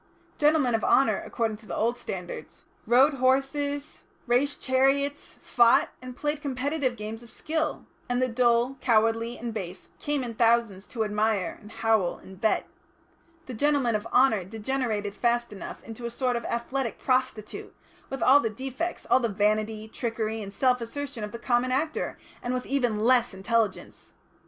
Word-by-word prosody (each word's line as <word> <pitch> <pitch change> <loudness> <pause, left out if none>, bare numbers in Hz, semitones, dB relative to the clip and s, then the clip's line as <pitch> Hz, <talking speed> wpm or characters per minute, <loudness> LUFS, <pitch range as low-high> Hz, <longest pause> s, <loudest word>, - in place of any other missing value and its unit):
Gentlemen 295 -4 +3
of 225 - 0
honour, 270 - +3
according 225 -3 -2
to 215 0 -18
the - - -4
old 235 +2 +1
standards, 180 -7 -7 0.2
rode 260 +6 +5
horses, 275 +3 0 0.2
raced 260 +4 +1
chariots, 275 +2 +1
fought, 235 -1 +4
and 255 -1 -8
played 295 0 -2
competitive 275 -1 -1
games 220 +1 -6
of 235 - -14
skill, 315 +6 -2 0.2
and 245 0 +1
the 255 - +2
dull, 240 +2 +2
cowardly 230 0 +2
and 235 -1 -5
base 185 -4 -6
came 290 -2 -1
in 235 -2 -5
thousands 225 -4 +2
to 225 -3 -2
admire, 210 -2 0
and 210 - -13
howl, 220 -5 +1
and 190 0 -14
bet. 220 - +1 0.8
The 255 - -7
gentlemen 275 -1 +2
of 215 +1 -2
honour 230 -5 +4
degenerated 215 0 -2
fast 235 +1 0
enough 195 - -8
into 230 +1 -6
a - - -3
sort 250 +1 -1
of 235 - -3
athletic 235 +1 -2
prostitute, 255 -5 -2 0.3
with 270 - -3
all 275 +3 +7
the 230 - 0
defects, 265 +9 -4
all 255 - +5
the 235 -3 0
vanity, 215 +1 0
trickery, 225 -1 -3
and 200 -1 -7
self 250 +4 +2
assertion 265 0 -5
of 210 - -5
the 235 - -6
common 240 +1 +1
actor, 305 +4 -1 0.2
and 245 +1 -2
with 250 - -3
even 245 -6 0
less 245 -2 +3
intelligence. 220 +1 -2
240 Hz, 165 wpm, -27 LUFS, 220-265 Hz, 0.8 s, all